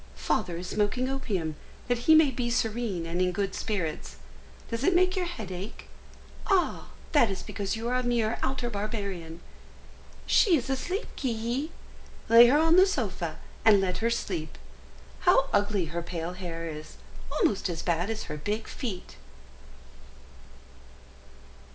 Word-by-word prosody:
Father 175 -2 -1
is 180 - -6
smoking 210 +6 0
opium, 200 - -2 0.3
that 245 -1 +1
he 315 - +10
may 310 -3 +6
be 240 -1 -2
serene 225 -6 -1
and 170 +2 -2
in 180 0 +2
good 195 +2 -2
spirits! 180 -8 -3 0.6
Does 230 +2 -2
it 365 +4 +3
make 370 +1 +4
your 365 -2 -1
head 220 - -6
ache? 185 +4 -7 0.6
Ah! 380 -3 +1 0.2
that 285 -8 +5
is 190 -2 -4
because 200 +1 -3
you 225 +1 -4
are 245 - 0
a 255 - +2
mere 235 -2 0
outer 260 -2 -1
barbarian. 200 -6 -4 0.8
She 365 -7 +5
is 270 0 -3
asleep, 360 - -2
Ki 240 +2 -2
hi; - - -18 0.6
lay 235 +1 +10
her 270 +4 +5
on 325 +2 +5
the 375 +1 +7
sofa, 390 - -2 0.3
and 210 -3 +7
let 185 -1 -1
her 230 - +1
sleep. 175 -9 -3 0.6
How - - +4
ugly 205 -3 +2
her 170 - -1
pale 170 0 -4
hair 170 -2 -5
is, 155 -1 -8 0.4
almost 310 - +1
as 165 -2 -4
bad 175 +3 0
as 220 -1 -3
her 150 - -6
big 210 +8 -3
feet!" 205 -8 -6
215 Hz, 155 wpm, -28 LUFS, 180-255 Hz, 0.8 s, he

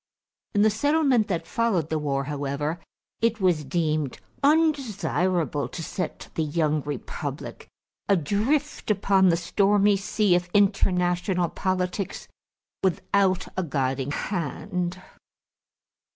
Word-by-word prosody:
In 205 - +5
the 215 - +5
settlement 270 -1 +2
that 175 -4 -2
followed 195 -10 0
the 160 - +1
war, 140 -2 -1
however, 145 +3 -3 0.4
it 230 -1 +1
was 180 -5 +2
deemed 155 -2 -1 0.2
undesirable 215 - +1
to 165 - -6
set 180 - -5
the - - -1
young 155 0 +1
republic 145 -3 -6 0.4
adrift 210 - 0
upon 195 -2 +4
the 170 - +3
stormy 200 +3 +3
sea 200 0 +1
of 175 0 +1
international 180 -3 +2
politics 185 +1 -2 0.5
without 190 0 +1
a 185 - 0
guiding 135 -4 -1
hand. 180 +3 -3
180 Hz, 110 wpm, -25 LUFS, 155-205 Hz, 0.5 s, In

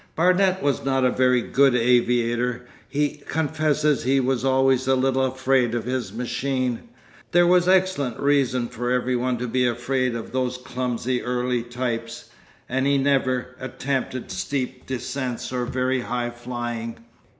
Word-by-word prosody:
Barnet 185 +2 +3
was 140 -4 0
not 135 -1 +1
a 125 - +3
very 125 -1 +3
good 135 -2 +3
aviator, 120 0 +1 0.2
he 145 0 -1
confesses 150 -2 +1
he 135 +2 +2
was 130 -1 0
always 130 -1 +2
a 135 - +4
little 130 0 +1
afraid 130 -2 +1
of 120 - -2
his 125 -5 -2
machine—there 125 - -2
was 180 0 +4
excellent 185 -10 +2
reason 135 -4 +2
for 120 +1 -4
every 125 0 +1
one 125 0 0
to 125 +1 -3
be 125 +1 +1
afraid 125 +1 -1
of 115 - -6
those 125 0 -1
clumsy 125 -1 -2
early 125 0 -1
types—and 120 +2 -5
he 140 0 +3
never 130 -2 0
attempted 130 -1 -3
steep 130 +6 -3
descents 130 -1 -4
or 125 -1 -1
very 130 +1 0
high 120 0 -2
flying. 120 -1 -5
125 Hz, 140 wpm, -23 LUFS, 120-135 Hz, 0.2 s, a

